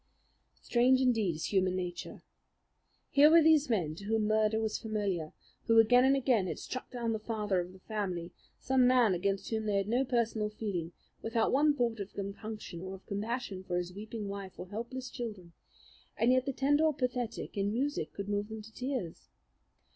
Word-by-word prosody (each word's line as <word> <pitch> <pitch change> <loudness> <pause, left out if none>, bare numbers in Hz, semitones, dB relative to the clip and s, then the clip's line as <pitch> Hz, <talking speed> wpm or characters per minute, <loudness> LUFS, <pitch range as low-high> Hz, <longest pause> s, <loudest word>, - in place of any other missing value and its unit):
Strange 255 +2 +4
indeed 225 -9 +2
is 160 - -4
human 185 -1 +2
nature. 180 -1 -5 0.9
Here 285 +2 +7
were 330 0 +7
these 310 -3 +5
men, 175 -10 0
to 200 +5 -10
whom 220 0 +1
murder 215 0 +2
was 220 -1 -1
familiar, 200 -8 -2 0.4
who 225 -1 +4
again 245 +3 +6
and 270 +1 +5
again 245 -8 +2
had - - -3
struck 255 - -6
down 235 -3 -2
the 220 - -2
father 210 -3 -1
of 175 +1 -4
the 190 - -14
family, 185 -6 -3 0.3
some 260 -1 +3
man 250 -5 +5
against 195 +4 -1
whom 220 -1 -1
they 205 - +1
had 195 0 0
no 245 +4 +2
personal 230 -4 0
feeling, 195 -6 -4 0.3
without 225 0 +1
one 290 +2 +4
thought 235 -4 0
of 200 0 -7
compunction 200 -2 -6
or 190 +1 -6
of 190 - -16
compassion 205 -1 -3
for 180 -1 -2
his 180 0 -3
weeping 215 +1 -6
wife 200 -1 -7
or 180 - -8
helpless 245 +4 -5
children, 205 -10 -7 0.6
and 235 +2 +3
yet 255 +1 +2
the - - +1
tender 290 +4 +2
or 310 -2 +3
pathetic 250 -4 -3
in 200 0 0
music 280 +6 -1
could 200 0 -6
move 205 +1 -1
them 220 -1 -7
to 225 +1 -14
tears. 250 -10 -4
220 Hz, 190 wpm, -31 LUFS, 195-250 Hz, 0.9 s, Here